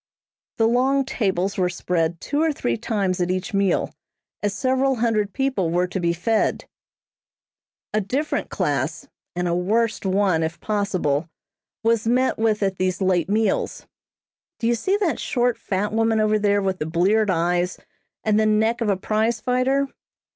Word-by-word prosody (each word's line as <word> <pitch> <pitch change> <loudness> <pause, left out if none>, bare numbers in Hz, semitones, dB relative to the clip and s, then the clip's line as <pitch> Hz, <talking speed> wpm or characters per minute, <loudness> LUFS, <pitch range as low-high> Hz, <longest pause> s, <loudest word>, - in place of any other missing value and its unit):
The 225 - +3
long 260 +3 +2
tables 195 -5 -1
were 180 -1 +2
spread 170 -2 -1
two 290 +1 -1
or 320 0 +3
three 120 - -1
times 190 - -1
at 175 - 0
each 185 0 -2
meal, 195 -1 +1 0.5
as 205 - 0
several 265 +1 +1
hundred 220 -4 0
people 260 -10 0
were 175 +2 +1
to 190 - -3
be 170 -1 +1
fed. 210 +6 0 1.3
A 215 - +2
different 270 +10 -2
class, - - -2 0.3
and 180 0 -1
a 170 - 0
worst 215 +6 0
one 190 -3 +2
if 160 +1 -3
possible, 185 -8 -1 0.5
was 225 -1 +2
met 255 +1 +2
with 220 -2 +1
at 195 -1 0
these 185 0 0
late 185 -2 +1
meals. 215 -1 0 0.7
Do - - -4
you 235 - +3
see 380 - 0
that 380 -7 0
short, 245 -2 +1
fat 205 +2 -2
woman 225 0 +2
over 215 0 +2
there 205 -1 +2
with 190 -1 -1
the 155 - -2
bleared 195 +6 +2
eyes, 175 +1 +1 0.5
and 215 -1 +2
the 215 - +3
neck 220 +2 +2
of 225 - +1
a 195 - +2
prize 220 +4 0
fighter? 255 +4 +1
210 Hz, 165 wpm, -23 LUFS, 185-230 Hz, 1.3 s, The